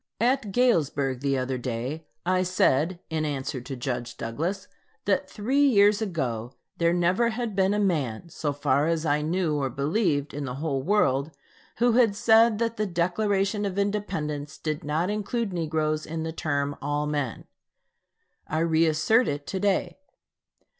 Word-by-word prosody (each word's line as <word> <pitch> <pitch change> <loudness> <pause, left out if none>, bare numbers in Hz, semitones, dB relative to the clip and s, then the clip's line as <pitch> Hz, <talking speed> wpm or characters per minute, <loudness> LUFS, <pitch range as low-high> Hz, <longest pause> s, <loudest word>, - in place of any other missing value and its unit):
At 240 -2 +1
Galesburg 150 - +2
the 140 0 0
other 130 0 -2
day, 130 +6 -4 0.2
I 185 +1 +2
said, 175 -2 +2
in 160 -1 0
answer 135 -3 -3
to 135 +2 -6
Judge 120 -2 -4
Douglas, 170 - -3 0.4
that 190 -1 +1
three 260 +7 +1
years 210 -5 +5
ago 130 - -3 0.2
there 170 0 +3
never 180 +7 +2
had 230 -2 -3
been 195 +1 +2
a - - 0
man, 155 - 0
so 150 -2 -2
far 145 0 +1
as 165 -1 0
I 150 0 +2
knew 160 0 0
or 135 -2 -1
believed, 145 - 0
in 145 0 -4
the 125 -1 -4
whole 140 -2 -2
world, 145 -6 +2 0.5
who 240 +1 +3
had 230 -3 +4
said 225 0 +5
that 230 0 -1
the 215 0 0
Declaration 195 +3 0
of 195 -2 -3
Independence 175 -8 -2
did 155 -2 -3
not 155 +6 0
include 210 0 -2
negroes 155 -2 -1
in 160 0 -4
the 160 0 -4
term 145 -3 -1
"all 145 +1 -1
men." 145 -6 -3 1.0
I 155 - -2
re 165 0 +3
assert 160 +11 +3
it 145 0 -3
to 190 - -3
day. 200 +6 0
165 Hz, 160 wpm, -26 LUFS, 145-205 Hz, 1.0 s, years